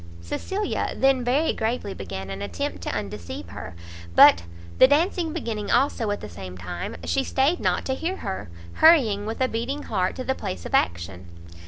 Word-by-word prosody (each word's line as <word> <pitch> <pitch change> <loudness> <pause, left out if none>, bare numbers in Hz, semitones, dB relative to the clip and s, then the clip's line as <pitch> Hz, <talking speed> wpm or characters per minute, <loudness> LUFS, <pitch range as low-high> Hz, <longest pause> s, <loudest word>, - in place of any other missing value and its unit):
Cecilia 385 - -3
then 270 -1 +3
very 270 +7 +2
gravely 220 -3 -2
began 95 0 -6
an 95 +1 -6
attempt 95 -4 -4
to - - -4
undeceive 85 +1 -5
her; 95 -1 -8 0.4
but 85 - +8 0.4
the 260 - +9
dancing 325 +3 +2
beginning 230 -10 -4
also 245 -3 +2
at 205 - -2
the - - -6
same 90 +1 -9
time, 85 -2 -5
she 85 0 0
stayed 280 +6 +1
not - - 0
to 265 - 0
hear 335 +7 -2
her, 190 - -5 0.2
hurrying, 225 -11 +5
with 225 +3 -4
a 260 - +4
beating 255 +5 -3
heart, 185 0 -1
to 255 - -4
the 265 - 0
place 90 - -6
of - - -7
action. 90 +1 0
210 Hz, 180 wpm, -25 LUFS, -, 0.4 s, the